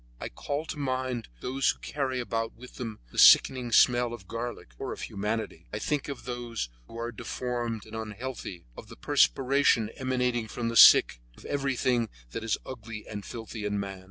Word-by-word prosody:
I - - -5
call 145 - -4
to 155 - -6
mind 130 -3 -2
those 135 +2 +1
who - - 0
carry 135 -3 -2
about 115 -2 -2
with 125 +2 -13
them 115 -4 -5
the - - -3
sickening 125 -3 +7
smell 120 0 +4
of 100 -6 -10
garlic 115 - -5
or - - -4
of - - -9
humanity. 105 -4 -4
I - - -3
think 145 +6 -1
of 120 -5 -7
those 120 - -4 0.2
who 115 - -10
are 115 +1 -3
deformed 120 -1 -4
and 110 0 -10
unhealthy, 110 - -6
of - - -10
the - - -11
perspiration 115 - +3
emanating 125 -3 0
from 115 +1 -3
the 115 - -4
sick, 60 - +8 0.2
of - - -15
everything 130 -4 0 0.2
that 115 - -5
is 115 - 0
ugly 115 -4 -8
and 105 - -6
filthy 115 -1 -7
in 105 0 -1
man. 100 -1 -5
120 Hz, 185 wpm, -28 LUFS, 110-130 Hz, 0.2 s, sick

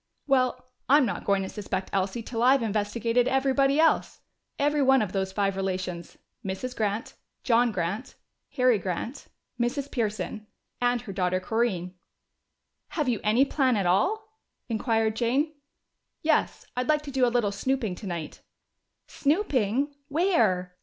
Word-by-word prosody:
"Well, 255 -2 +1 0.2
I'm 290 0 +6
not 200 -6 -4
going 200 -1 +2
to - - -4
suspect 190 -2 -4
Elsie 195 +4 -1
till 230 0 -4
I've 260 +1 +5
investigated 230 +3 0
everybody 270 +1 +2
else. 325 0 +2 0.4
Every 295 +1 +2
one 265 0 +5
of 195 - -4
those 190 -1 -1
five 195 0 0
relations 185 -2 -4 0.3
Mrs. 200 +7 -4
Grant, 210 0 -2 0.3
John 240 -1 +3
Grant, 195 +5 -3 0.4
Harry 250 -5 +4
Grant, 190 +9 -4 0.3
Mrs. 270 +4 -1
Pearson, 215 -3 -3 0.3
and 245 -1 +2
her 215 -5 -8
daughter 185 -1 0
Corinne!" 185 -3 -1 0.9
"Have 300 -5 -1
you 230 -4 0
any 225 +6 +4
plan 260 -5 +2
at 195 - 0
all?" 435 - 0 0.3
inquired 225 -1 +1
Jane. 265 +7 +1 0.7
"Yes, - - +1
I'd 250 +2 -2
like 300 -1 +3
to 285 - -7
do 265 -1 +1
a - - +6
little 235 -4 +1
snooping 225 0 -1
tonight." 175 -5 -6 0.6
"Snooping? 280 - 0
Where? 225 - +1
230 Hz, 140 wpm, -27 LUFS, 195-270 Hz, 0.9 s, I'm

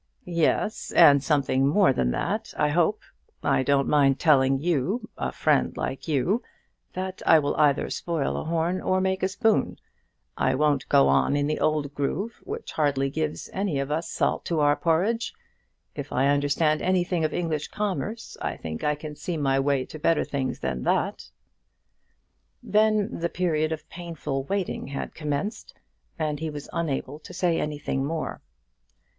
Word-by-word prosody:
"Yes; 175 +4 0
and 140 -5 +7
something 140 -3 +2
more 175 0 +4
than 60 - +1
that 60 - -2
I 150 - +2
hope. 175 +7 +2 0.4
I - - +2
don't 140 0 +2
mind 140 -2 +4
telling 135 -4 +4
you, 170 - -1
a - - -3
friend - - +1
like - - -4
you, 160 - +1 0.5
that 185 0 -5
I - - +8
will 145 -2 0
either 145 -2 +3
spoil 165 -5 -2
a - - -3
horn 170 +3 0
or 185 - +1
make 190 0 0
a 190 - +2
spoon. 215 +3 +1 0.6
I 130 - +1
won't 145 -1 +1
go 70 - +5
on 70 - +3
in 145 0 +1
the 155 +1 -1
old 150 -2 0
groove, 170 +11 -3
which 445 +3 -6
hardly 140 -3 +1
gives 155 0 -3
any 190 -6 -1
of 140 +1 -2
us 165 +2 -1
salt - - 0
to 165 -2 0
our 145 0 +4
porridge. 180 - 0 0.6
If 145 -1 -7
I 135 +2 +2
understand 145 +2 +2
anything 180 -2 +1
of 155 - +1
English 160 -4 -2
commerce, 210 +2 -3
I - - -3
think 80 -1 -6
I 150 0 +2
can 150 0 -8
see 170 +2 -4
my 135 -2 +1
way 135 -1 +1
to 155 - -10
better 165 +1 +2
things 135 -2 -3
than 65 -1 -2
that." - - -1 1.3
Then 215 -1 +2
the 170 0 -1
period 160 -3 0
of 160 - -5
painful 160 -6 -5
waiting 195 -3 -2
had 135 0 -5
commenced, 150 +7 -4 0.4
and 150 -2 -2
he 160 0 -3
was 145 -1 -8
unable 150 -3 -2
to 180 - -11
say 175 -2 +1
anything 145 -2 -2
more. 160 +2 -3
155 Hz, 165 wpm, -26 LUFS, 140-175 Hz, 1.3 s, I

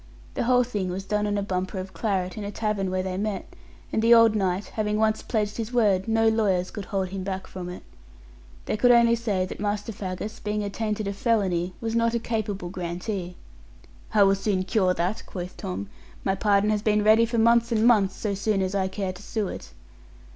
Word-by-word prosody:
The - - -1
whole 250 0 +4
thing 205 -6 -3
was 185 +2 -4
done 210 +1 0
on 205 0 0
a 200 - -1
bumper 185 0 -3
of 190 0 -6
claret 185 -5 -1
in 215 - -5
a 200 - -4
tavern 210 -2 -1
where 185 0 -1
they 185 -1 -3
met; 210 0 -2 0.5
and 220 - +2
the 230 +1 +7
old 230 -1 +6
knight 190 -1 0
having 210 -1 -1
once 220 0 +2
pledged 210 -3 -2
his 230 0 -4
word, 205 -6 +2
no 225 0 +3
lawyers 200 -5 +1
could 205 -3 -6
hold 190 -2 -2
him 190 0 -5
back 190 0 -4
from 180 -1 -7
it. 180 - -8 0.8
They - - -1
could 245 +3 +4
only 235 -1 +6
say 210 -5 0
that - - -8
Master 205 +1 -2
Faggus, 205 +2 -5
being 210 0 -2
attainted 210 0 -2
of 200 - -3
felony, 190 -6 0
was 225 -1 -3
not 230 0 +2
a - - +1
capable 210 -6 -3
grantee. 180 +1 -4 0.8
'I 205 - +7
will 195 0 +5
soon 195 -1 0
cure 185 -1 +1
that,' 180 +5 -1
quoth 180 -1 -6
Tom, 95 +2 -5 0.4
'my 195 - +2
pardon 205 +1 +2
has 210 -1 0
been 210 -1 +2
ready 220 +2 +5
for 235 +1 -2
months 235 +1 +4
and 225 -1 +2
months, 205 -5 +4
so 210 -2 -2
soon 200 0 0
as 185 +1 -2
I 190 -1 +1
care 190 -1 -3
to 180 - -12
sue 205 -1 -2
it.' - - -8
205 Hz, 215 wpm, -25 LUFS, 190-220 Hz, 0.8 s, the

